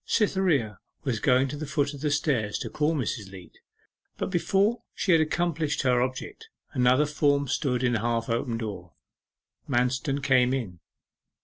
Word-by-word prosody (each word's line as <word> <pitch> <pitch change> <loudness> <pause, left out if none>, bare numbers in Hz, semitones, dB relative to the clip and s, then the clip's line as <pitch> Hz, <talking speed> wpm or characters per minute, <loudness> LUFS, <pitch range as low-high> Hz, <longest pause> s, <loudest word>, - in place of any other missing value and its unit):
Cytherea 180 - +1 0.2
was 130 -7 -1
going 130 +1 +3
to 145 - -5
the 150 +1 -5
foot 145 0 0
of 140 - -9
the 150 - 0
stairs 140 -8 0
to - - -6
call 155 +2 +1
Mrs. 110 -7 -3
Leat, 95 -2 -13 0.6
but - - -3
before 200 +5 +1
she 190 - 0
had 165 -2 +6
accomplished 155 -2 0
her 125 -2 +3
object, 130 - -4 0.2
another 130 +2 +4
form 145 -1 +1
stood 125 -2 0
at 125 - +2
the 115 - +1
half 115 0 -1
open 115 0 -1
door. 95 -7 -6 0.8
Manston 130 +3 0
came 130 -2 +3
in. 100 -10 -5
135 Hz, 165 wpm, -27 LUFS, 120-150 Hz, 0.8 s, had